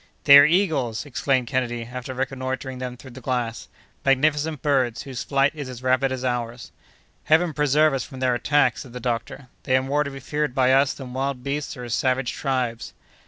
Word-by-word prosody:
"They 140 -1 +10
are 145 - +7
eagles!" 150 - +1
exclaimed 135 -2 0
Kennedy, 120 -2 -2
after 125 +1 -6
reconnoitring 130 0 -4
them 125 -1 -5
through 130 +1 -12
the 130 +2 -11
glass, 120 -2 -3 0.4
"magnificent 150 +2 +1
birds, 130 -5 +1
whose 130 -2 -6
flight 140 0 +2
is 145 -4 -6
as 125 0 -9
rapid 130 +1 +2
as 130 0 -3
ours." 120 -1 -3 0.5
"Heaven 160 +1 +3
preserve 150 +1 +3
us 135 - -1
from 130 - -10
their 130 -1 +2
attacks!" 145 +4 +2
said 125 -4 -11
the 125 - -6
doctor, 120 +2 -4
"they 130 - +2
are 130 - 0
more 145 +2 +1
to 140 - -5
be 135 -1 -8
feared 150 0 -2
by 130 -1 +4
us 135 +1 +3
than 130 -3 -9
wild 135 -1 -2
beasts 140 +1 -3
or 125 -1 -7
savage 130 +1 0
tribes." 125 -4 -2
130 Hz, 195 wpm, -23 LUFS, 125-140 Hz, 0.5 s, They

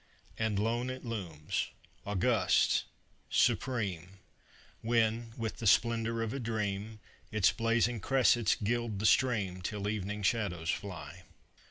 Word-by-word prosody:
And 110 -2 -1
lone 115 +4 0
it 130 0 -6
looms, 90 -10 -3 0.4
august, 100 -3 +2 0.4
supreme, 95 -7 0 0.6
When, 115 0 +1
with 115 -1 -3
the 115 - -2
splendor 115 +2 +3
of 110 - -3
a 140 - -3
dream, 110 -2 -3 0.3
Its 105 -3 +4
blazing 115 0 +1
cressets 120 -2 +3
gild 115 0 -1
the 105 - -2
stream 105 -7 +2
Till 100 +2 -3
evening 105 0 -3
shadows 95 -6 0
fly. 90 -3 -7
110 Hz, 120 wpm, -32 LUFS, 100-115 Hz, 0.6 s, Its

